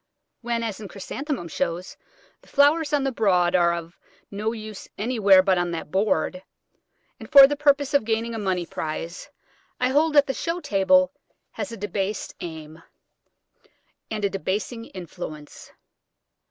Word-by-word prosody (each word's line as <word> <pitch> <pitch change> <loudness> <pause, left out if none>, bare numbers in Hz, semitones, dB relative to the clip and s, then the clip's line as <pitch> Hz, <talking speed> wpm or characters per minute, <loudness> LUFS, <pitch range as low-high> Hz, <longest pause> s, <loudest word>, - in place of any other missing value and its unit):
When, 235 -1 -2
as 220 -3 -4
in 210 - -7
Chrysanthemum 230 - -5
shows, 170 +3 -3 0.5
the - - -23
flowers 295 +2 +3
on 290 -2 +2
the 270 - 0
board 185 -6 +2
are 170 -1 +4
of 170 0 -6 0.3
no 210 +2 -2
use 215 -3 -8
anywhere 205 -4 +4
but 190 -2 +2
on 175 0 -1
that 160 -2 -6
board, 190 -2 0 0.8
and - - -11
for 275 -1 +11
the 290 +1 0
purpose 285 0 +2
of 285 - +4
gaining 225 +1 -1
a 225 - -4
money 185 -4 -1
prize, 165 - -5 0.5
I 250 - +2
hold 300 +4 +2
that 285 -1 +7
the 270 - -2
show 335 +6 -3
table 275 - +3 0.4
has - - -5
a 230 - -7
debased 205 0 -3
aim, 160 -1 -8 1.3
and 215 -2 -2
a - - +2
debasing 205 +5 -3
influence. 170 -6 -9
210 Hz, 155 wpm, -24 LUFS, 180-270 Hz, 1.3 s, for